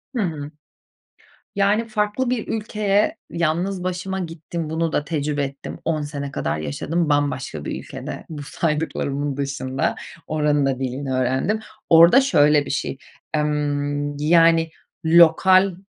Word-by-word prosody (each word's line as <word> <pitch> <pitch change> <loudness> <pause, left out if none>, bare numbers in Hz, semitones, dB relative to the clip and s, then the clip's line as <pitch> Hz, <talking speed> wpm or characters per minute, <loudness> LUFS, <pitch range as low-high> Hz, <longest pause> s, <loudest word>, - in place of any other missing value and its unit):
Hımm. 160 -10 -2 1.1
Yani, 205 +3 +2
farklı 215 +3 -1
bir 245 -3 -2
ülkeye 215 +4 0
yalnız 175 +3 -1
başıma 185 +1 -3
gittim. 165 -1 -5
Bunu 160 0 -1
da 145 - 0
tecrübe 150 -2 -1
ettim. 140 0 -7
10 155 -2 0
sene 145 -1 -5
kadar 75 - -2
yaşadım. 150 - -2
Bambaşka 140 - -1
bir - - -4
ülkede - - -8
bu 150 -3 -7
saydıklarımın 145 -2 -2
dışında. 135 -1 -2 0.3
Oranın 150 -2 +1
da 135 -2 0
dilini 130 +1 -3
öğrendim. 130 - 0 0.3
Orada 170 +10 +8
şöyle 150 - +4
bir - - -6
şey, 140 -1 -2 0.4
emm, 145 -1 -1
yani, 165 +1 +4 0.3
lokal 175 +3 +5
155 Hz, 125 wpm, -22 LUFS, 145-180 Hz, 1.1 s, Orada